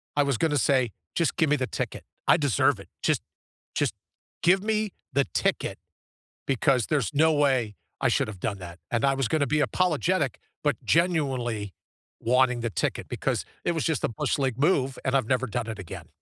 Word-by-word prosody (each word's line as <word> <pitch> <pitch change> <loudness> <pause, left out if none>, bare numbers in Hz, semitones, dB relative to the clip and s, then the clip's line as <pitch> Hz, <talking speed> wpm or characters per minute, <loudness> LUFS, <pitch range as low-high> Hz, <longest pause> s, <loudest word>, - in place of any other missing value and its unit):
I 145 - +4
was 140 -4 0
gonna 155 -3 +2
say, 130 -2 +3 0.2
just 170 - +1
give 165 -4 +2
me - - +6
the 130 -2 -1
ticket, - - -4 0.2
I - - +6
deserve 145 - +2
it, - - -11 0.2
just - - +2 0.5
just - - 0 0.5
give 185 +2 +4
me 215 0 0 0.2
the 140 0 +4
ticket, - - 0 0.7
because 130 -2 +2
there's 140 -9 +1
no 160 +2 +4
way 130 -8 +2 0.2
I - - +2
should - - +2
have 100 -4 -8
done 100 +1 -2
that, 85 -1 -9
and 120 -2 0
I 135 - +4
was 135 -3 0
going 155 - +1
to 140 - +2
be 155 - +1
apologetic, 180 +1 +1 0.3
but, 145 -1 +2
genuinely 130 - +1 0.5
wanting 125 0 +3
the 120 - -1
ticket - - -2
because - - -1 0.2
it - - +3
was 160 - -1
just 160 -4 0
a - - +2
bush 115 - -1
league 130 -4 0
move, 135 -4 +2
and 130 - +1
I've 130 -5 +2
never 130 0 +1
done 115 +1 -3
it 110 -2 -5
again. 95 - -8
135 Hz, 195 wpm, -27 LUFS, 120-155 Hz, 0.7 s, me